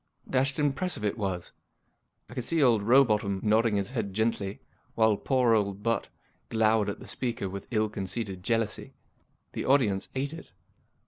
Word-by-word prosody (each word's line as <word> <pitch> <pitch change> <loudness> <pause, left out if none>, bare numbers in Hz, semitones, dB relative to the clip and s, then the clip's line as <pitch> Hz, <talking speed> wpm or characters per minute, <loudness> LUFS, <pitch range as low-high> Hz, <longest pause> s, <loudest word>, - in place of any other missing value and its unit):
Dashed 135 +1 +1
impressive 145 - 0
it 105 - 0
was. 95 -6 -3 0.7
I - - -12
could 125 -1 -3
see 165 +3 +1
old 115 -5 +4
Row 125 +7 +6
botham 105 -5 0
nodding 110 0 +3
his 100 +1 -1
head 105 -7 -3
gently, 110 -3 -1 0.4
while 110 -2 +4
poor 125 +1 +2
old 100 -2 0
Butt 115 0 0 0.4
glowered 110 -2 +2
at 100 - -5
the - - -11
speaker 120 -6 -2
with 100 +1 -7
ill 110 -2 +1
concealed 100 -1 -4
jealousy. 115 +1 -1 0.6
The - - -3
audience 110 -8 +2
ate 140 +3 -2
it. 165 - -11
110 Hz, 160 wpm, -28 LUFS, 100-125 Hz, 0.7 s, Row